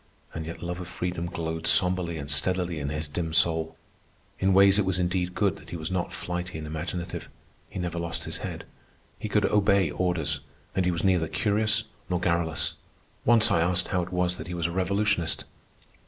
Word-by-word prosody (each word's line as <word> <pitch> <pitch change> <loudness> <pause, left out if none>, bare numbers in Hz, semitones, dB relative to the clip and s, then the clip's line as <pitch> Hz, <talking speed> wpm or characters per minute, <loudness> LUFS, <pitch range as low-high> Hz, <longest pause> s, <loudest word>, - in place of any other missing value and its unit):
And 80 -1 -4
yet 85 - -7
love 90 +1 -3
of 90 - -6
freedom 90 -1 -3
glowed 80 -1 -3
sombrely 90 0 +2
and 70 -2 -5
steadily 85 +3 +1
in 70 -1 -2
his 75 +1 -3
dim 80 +2 -3
soul. 80 -1 +2 0.6
In 95 +1 +3
ways 100 +1 +7
it - - +4
was 95 -1 +1
indeed 90 0 0
good 100 0 +2
that - - -14
he - - -5
was 80 +2 -4
not 90 -1 -1
flighty 90 0 -4
and 80 - -5
imaginative. 85 +3 -4 0.4
He - - -8
never 85 -2 -2
lost 85 -1 -3
his - - -3
head. - - -5 0.6
He - - -4
could - - +3
obey 100 -4 +3
orders, 80 -5 0 0.3
and 95 - +1
he 90 - +3
was 85 -2 -2
neither 90 -4 +3
curious 105 +4 +1 0.3
nor 90 -1 +1
garrulous. 85 -2 +1 0.5
Once 115 -1 +6
I 85 - +4
asked 90 +1 +1
how 90 -3 +1
it 90 - -5
was 90 0 +1
that - - -7
he 90 - -4
was 85 -1 -1
a 85 - +1
revolutionist. 95 -2 +1
90 Hz, 200 wpm, -27 LUFS, 80-95 Hz, 0.6 s, ways